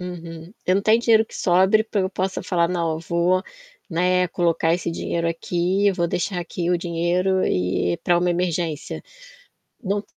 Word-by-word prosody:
Uhum. 170 -1 -8
Eu 185 - +3
não 200 - 0
tenho 220 +2 +4
dinheiro 225 -2 +4
que - - -15
sobre 190 +4 +3
para 215 -2 -1
eu 190 0 -1
possa 190 0 -2
falar: 170 -2 +1
"Não, 170 -3 -1
eu 160 - -3
vou, 170 +2 +1 0.5
né, 180 +2 +2
colocar 165 -2 +1
esse 175 -1 -3
dinheiro 170 0 -2
aqui, 175 +4 0
eu 195 - +3
vou 170 -1 0
deixar 180 +1 -2
aqui 175 0 -3
o 175 - +2
dinheiro 175 +2 0
e 90 -1 0
para 175 -1 +3
uma 180 0 +1
emergência". 170 -3 -2 0.8
Não 200 +1 -1
175 Hz, 175 wpm, -22 LUFS, 170-185 Hz, 0.8 s, tenho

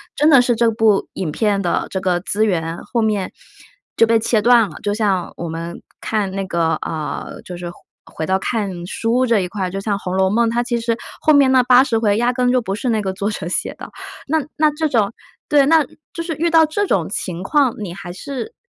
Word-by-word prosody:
真 300 - +3
的 275 -5 +7
是 245 -1 +1
这 230 0 +2
部 220 -2 +2
影 185 -4 -3
片 205 +1 0
的 175 - -1
这 190 - -3
个 180 -2 0
资 210 +3 0
源 165 -4 -1
后 235 - -1
面 210 -4 -1 0.6
就 230 - +5
被 230 - +4
切 220 0 +1
断 235 -3 +5
了， - - -11
就 205 - -1
像 200 -5 -1
我 170 -1 -5
们 165 +1 -6 0.2
看 210 -3 -2
那 195 0 -3
个， 165 -2 +1
呃， 155 -2 -5
就 180 -1 -8
是 175 -1 -6
回 - - -10 0.3
回 160 - -5
到 190 +3 +1
看 195 -5 -3
书 235 +5 0
这 230 -4 +2
一 180 - -2
块， 190 -3 -3
就 195 - -5
像 200 -1 -1
红 185 -1 -4
楼 190 0 +3
梦， 230 +3 +2
它 240 +1 0
其 240 0 -1
实 230 0 -1 0.2
后 310 - +3
面 275 -2 +5
那 260 -1 +5
80 250 -2 +4
回 210 -3 +2
压 240 +2 +2
根 250 0 +1
就 250 0 +2
不 195 -3 -4
是 250 +5 -4
那 220 -2 +1
个 190 -2 -2
作 200 +2 -2
者 210 -6 -5
写 - - -2
的。 - - -10 0.3
那 315 +3 +1 0.2
那 305 -1 +3
这 315 +1 0
种 225 -6 +1 0.4
对， 285 -2 +5
那 315 0 +4 0.3
就 335 - -4
是 330 -1 -3
遇 335 +2 +1
到 325 -1 +5
这 390 +6 -1
种 175 -3 0
情 180 -3 -4
况， 270 +3 +2
你 195 -5 -5
还 175 -1 -8
是 280 - -6
220 Hz, 245 characters per minute, -19 LUFS, 190-250 Hz, 0.6 s, 的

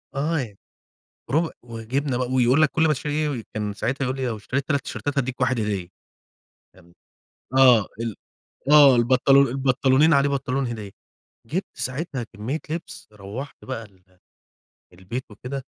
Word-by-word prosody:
آه 155 +3 0
ي 105 -5 -7 0.8
رب 160 +3 +2
وجِبنا 120 +3 -3
ب - - -2
ويقول 130 +4 +4
لك 155 - +5
كل 160 0 +2
ما 155 - +3
تشتري 145 +2 -3
إيه 150 -6 -1
كان 105 -1 -2
ساعتها 135 +6 -2
يقول 130 +1 -2
لي:" 130 -1 -2
لو 115 - -2
اشتريت 130 +6 -3
3 140 -2 +1
تيشيرتات 145 -1 -3
هادّيك 130 0 -2
1 125 -2 +1
هدية." 100 -4 -2 0.9
فاهم؟ 85 +1 -21 0.6
آه 125 -5 +6
ال 115 -2 -3 0.6
آه 140 -4 +8
البنطلو 130 +3 +4
البنطلونين 135 +4 +3
عليه 140 0 +4
بنطلون 135 -1 -1
هدية. 110 -4 -6 0.6
جِبت 180 - -2
ساعتها 130 -1 -3
كمّية 115 +9 -3
لبس 165 +1 -6
روّحت 105 +8 -8
بقى 130 -3 -4
ال 95 -3 -23 0.9
البيت 95 +8 -6
وكده 130 +5 -6
130 Hz, 150 wpm, -24 LUFS, 115-140 Hz, 0.9 s, آه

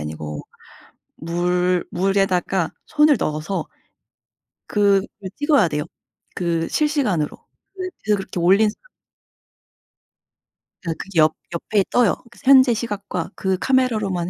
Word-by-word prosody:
아니고 75 0 -6 0.7
물 180 +2 0
물에다가 190 -2 +1
손을 300 -3 +4
넣어서 155 +3 -2 1.0
그거 200 -1 +2 0.3
찍어야 290 - +3
돼요. 150 -1 -2 0.5
그 170 -2 -1
실시간으로 265 - 0 0.4
그 370 -1 -5 0.3
그렇게 185 -2 -5
올린 195 +5 +4
사람. 365 - -19 2.0
그 165 -2 -3 0.2
옆 155 -1 +4 0.2
옆에 200 +4 0
떠요. 240 -6 +3 0.3
현재 260 -2 +6
시각과 205 -6 -4
그 190 -1 -1
카메라로만 215 -8 0
190 Hz, 215 characters per minute, -21 LUFS, 170-230 Hz, 2.0 s, 현재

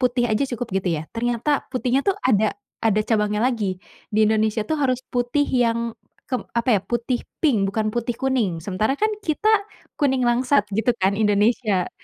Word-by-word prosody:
putih 245 -1 +2
aja 215 +6 +2
cukup 245 - -4
gitu 185 - -3
ya, 160 - -7
ternyata 240 +5 -1
putihnya 255 0 +1
tuh 395 - +2
ada 215 +1 +3 0.3
ada 215 -1 +3
cabangnya 210 -2 +1
lagi. 215 -7 0 0.3
Di 215 +1 +3
Indonesia 220 0 +1
tuh 315 - -1
harus 255 -3 +1
putih 245 +4 +1
yang 235 -2 +1 0.4
kep 255 - -2
apa 235 -3 +3
ya, - - -9
putih 240 +1 -2 0.2
pink, 225 -11 +3
bukan 215 +1 -1
putih 240 0 -1
kuning. 230 -11 -1
Sementara 205 +7 0
kan 430 +9 +1
kita 400 +3 -1 0.5
kuning 265 -3 +2
langsat 245 +1 +3
gitu 225 +4 +1
kan 200 +2 +2
Indonesia. 210 -2 +2
235 Hz, 170 wpm, -22 LUFS, 215-255 Hz, 0.5 s, ada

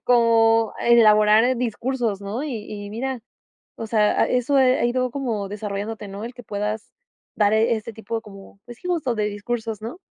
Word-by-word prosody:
como 225 -2 +4
elaborar 220 +1 +5
discursos, 240 -3 -2
¿no? 215 +7 -4
Y 240 -8 -4
y 205 -1 -6
mira, 255 +3 -3 0.6
o 225 - -5
sea, 215 -1 +2
a - - +3
eso, 250 +3 +2
eh, 255 -1 +4
ha - - +1
ido 250 +1 0
como 230 -7 -3
desarrollándote, 210 +1 -5
¿no?, 200 +3 -7
el 240 +1 -7
que 245 - -11
puedas 210 +1 -4 0.4
dar, 205 -1 +3
eh, 225 +2 +3
este 220 +1 -7
tipo 225 +1 -5
como, 195 -2 -14
pues, 240 0 -11
sí - - -10
justo 325 -9 0
de 210 - 0
discursos, 220 +1 -4
¿no? 240 +11 -6
225 Hz, 185 wpm, -23 LUFS, 210-245 Hz, 0.6 s, elaborar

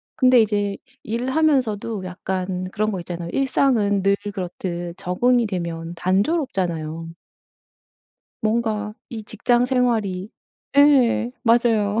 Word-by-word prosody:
근데 255 -2 +5
이제 205 -2 0 0.3
일하면서도 235 -4 0
약간 185 0 -4
그런 215 +1 0
거 190 - -3
있잖아요. 170 -1 -6
일상은 240 -7 +2
늘 200 0 +4 0.2
그렇듯 175 -2 -5
적응이 240 +7 +1
되면 170 -3 -4
단조롭잖아요. 180 - -1 1.3
뭔가 215 -1 -1 0.2
이 225 -3 -6
직장 240 +3 +1
생활이 220 -7 0 0.5
예 265 -5 +5
맞아요. 230 -3 +3
210 Hz, 240 characters per minute, -22 LUFS, 185-240 Hz, 1.3 s, 근데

